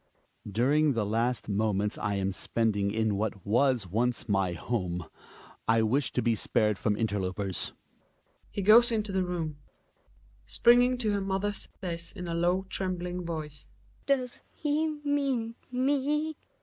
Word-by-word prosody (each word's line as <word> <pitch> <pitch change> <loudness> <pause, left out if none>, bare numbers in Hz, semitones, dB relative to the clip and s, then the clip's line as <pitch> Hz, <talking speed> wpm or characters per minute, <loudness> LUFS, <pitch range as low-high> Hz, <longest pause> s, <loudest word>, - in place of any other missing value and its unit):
During 140 +7 +3
the 115 -3 0
last 115 +4 0
moments 105 0 0
I 100 - -1
am 95 0 0
spending 105 0 0
in 110 -1 0
what 105 -1 -3
was 120 +1 +2
once 115 +6 0
my 95 -4 +1
home 90 -3 -3 0.6
Ijvished 115 +5 +2
to - - 0
be 115 0 +3
spared 110 -2 +1
from 105 -2 0
interlopers. 100 -3 -1 0.8
He 200 - -4
goes 235 +4 +7
into 215 -2 -1
the 190 -1 +1
room. 165 -4 -3
Hedvig 145 - -33
(springing 245 +1 +4
to 225 -4 +1
her 200 -1 0
mother 195 +1 -1
says 170 -4 -5
in 180 -3 -6
a 170 - -2
low 175 +3 +1
tremb 185 -1 -2
ling 180 0 -4
voice). 155 -4 -6 0.4
Does 255 -3 0
he 305 +1 0 0.2
mean 270 -6 0 0.2
me 290 +4 0
145 Hz, 145 wpm, -29 LUFS, -, 0.8 s, goes